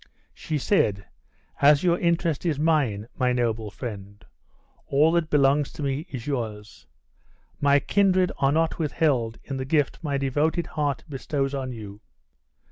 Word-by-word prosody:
She 155 - -3
said: 105 - +1 0.6
"As 145 +2 +6
your 175 -1 +2
interest 170 -2 0
is 165 -5 0
mine, 140 -10 +1
my 125 0 +1
noble 115 -3 -1
friend, 100 -1 -8 0.6
all 150 +4 +4
that 170 -2 +1
belongs 140 0 +3
to 150 - -6
me 140 +4 -2
is 130 -7 -7
yours. 110 -7 -5 0.7
My 140 0 +4
kindred 185 +1 +2
are 135 0 +3
not 165 +3 0
withheld 140 -8 0
in 135 - -5
the 130 - -3
gift 145 0 0
my 140 -3 -1
devoted 150 +5 0
heart 145 -4 -2
bestows 135 -1 -2
on 135 -2 -3
you. 105 -3 -9
140 Hz, 145 wpm, -25 LUFS, 120-155 Hz, 0.7 s, As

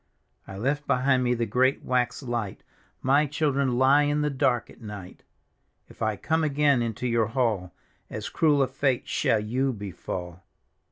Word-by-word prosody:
" - - -42
I 95 - -8
left 140 +7 -1
behind 130 0 +2
me 125 0 +1
the 115 0 -1
great 130 +5 +1
wax 125 +1 0
light; 120 -6 -4 0.4
My 140 +3 +3
children 140 -3 0
lie 135 +3 +5
in 145 0 +1
the 150 0 0
dark 130 -3 0
at - - -18
night 105 -4 -9 0.4
" - - -44
If - - -19
I 110 -1 +1
come 160 +9 0
again 145 -3 +2
into 115 +1 -3
your 115 -3 +2
hall, 110 -7 -1 0.4
As - - -5
cruel 150 -4 +3
a - - 0
fate 135 -1 0
^all 105 -2 0
you 130 +4 0
befall 90 -4 -6
125 Hz, 175 wpm, -26 LUFS, 110-140 Hz, 0.4 s, lie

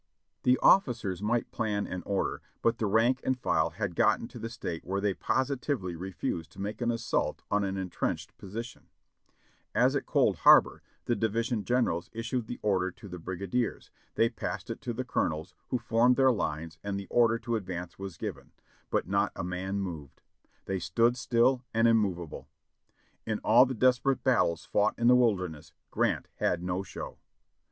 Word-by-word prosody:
The 125 +1 +4
officers 120 - +3
might 115 +3 0
plan 105 -2 -1
and 90 - -5
order, 100 -1 -1 0.2
but 115 0 +2
the 110 - +1
rank 120 +6 +3
and 130 -1 +1
file - - +1
had - - -4
gotten - - +2
to - - -10
that 115 - -5
state 90 -7 -5
where 95 +2 -2
they 100 -1 +1
positively 130 - -1
refused 85 -2 -4
to 100 - -14
make 105 +4 -4
an 120 - +1
assault 115 -1 -1
on 105 0 +2
an 95 0 -2
entrenched 95 -2 -3
position; 115 +5 -7 0.9
as - - +4
at - - -2
Cold - - +3
Harbor, - - +6 0.2
the 120 - +1
divis 115 +2 -1
ion 110 -4 0
generals 120 -9 0
issued 115 +1 -3
the 120 - -5
order 95 -3 +2
to 95 - -13
the 90 -1 -8
brigadiers; 100 +7 -3 0.2
they 115 - +4
passed 115 - -5
it - - -6
to - - -3
the - - -4
colonels, 80 +3 -1
who 125 - 0
formed 120 +1 +3
their 130 0 +5
lines 80 -6 -3
and 100 -1 -2
the 100 - -7
order 115 -1 +4
to 120 0 -2
advance 90 -4 -5
was 95 -3 -6
given, - - -6 0.4
but - - 0
not - - +1
a - - -4
man 95 +2 -3
moved; 80 -8 -6 0.4
they 95 -1 -2
stood 115 +9 +2
still 125 +1 +2
and 115 +1 +4
immovable. 95 -8 0 0.8
In 110 -1 0
all 120 +4 +6
the 130 - -3
desperate 130 +3 +2
battles 85 - +2
fought 105 - +1
in 120 - -1
the 125 +1 +7
Wilderness, 90 -11 0 0.2
Grant - - 0
had 90 0 0
no 90 +1 -1
show. 95 - -8
105 Hz, 180 wpm, -29 LUFS, 90-120 Hz, 0.9 s, the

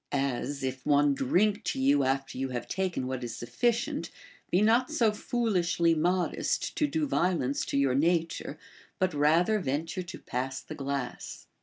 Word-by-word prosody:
As, 140 0 -2
if 130 -1 -3
one 145 -1 +4
drink 200 +11 +1
to - - -1
you 140 +1 +4
after 135 +1 -1
you 135 0 -1
have 120 -2 -4
taken 185 -7 -2
what 130 -1 -4
is 120 -1 -5
sufficient, 235 - -1 0.4
be 180 - +3
not 230 +5 +3
so 225 -3 +2
fool 235 +2 -1
ishly 170 -2 +2
modest 175 +3 0
to 300 - +2
do 305 +2 0
violence 170 - 0
to - - -2
your 140 -2 +3
nature, 165 +1 0 0.4
but 185 -2 +1
rather 165 +8 +3
venture 165 +3 -2
to 175 - -8
pass 130 +2 -4
the - - -9
glass. 140 -2 -5
150 Hz, 165 wpm, -29 LUFS, 135-185 Hz, 0.4 s, one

